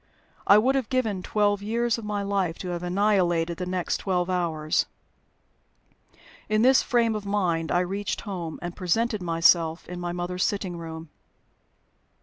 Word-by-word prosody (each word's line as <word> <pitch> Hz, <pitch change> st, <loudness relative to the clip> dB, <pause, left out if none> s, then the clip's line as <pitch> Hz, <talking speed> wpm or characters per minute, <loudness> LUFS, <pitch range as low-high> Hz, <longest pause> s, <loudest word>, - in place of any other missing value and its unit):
I 200 Hz, -, +8 dB
would 250 Hz, +5 st, +3 dB
have 265 Hz, -4 st, -1 dB
given 225 Hz, -7 st, 0 dB
twelve 205 Hz, 0 st, +1 dB
years 230 Hz, +2 st, 0 dB
of -, -, -9 dB
my 205 Hz, -1 st, -2 dB
life 195 Hz, -4 st, -1 dB
to 180 Hz, -, -6 dB
have 175 Hz, -1 st, -3 dB
annihilated 175 Hz, -3 st, +1 dB
the 180 Hz, -, -4 dB
next 180 Hz, -1 st, -1 dB
twelve 180 Hz, -2 st, -1 dB
hours. 160 Hz, -4 st, 0 dB, 1.6 s
In 215 Hz, +1 st, +2 dB
this 260 Hz, +1 st, +6 dB
frame 235 Hz, -3 st, +2 dB
of 210 Hz, -, -4 dB
mind 180 Hz, -5 st, 0 dB
I 175 Hz, -, +3 dB
reached 195 Hz, +2 st, -3 dB
home, 175 Hz, -6 st, -5 dB
and 175 Hz, 0 st, -5 dB
presented 215 Hz, +4 st, 0 dB
myself 165 Hz, -1 st, +2 dB
in 180 Hz, 0 st, -6 dB
my 175 Hz, 0 st, -3 dB
mother's 180 Hz, +1 st, -2 dB
sitting 195 Hz, -3 st, -1 dB
room. 160 Hz, -1 st, -8 dB
185 Hz, 155 wpm, -26 LUFS, 175-210 Hz, 1.6 s, I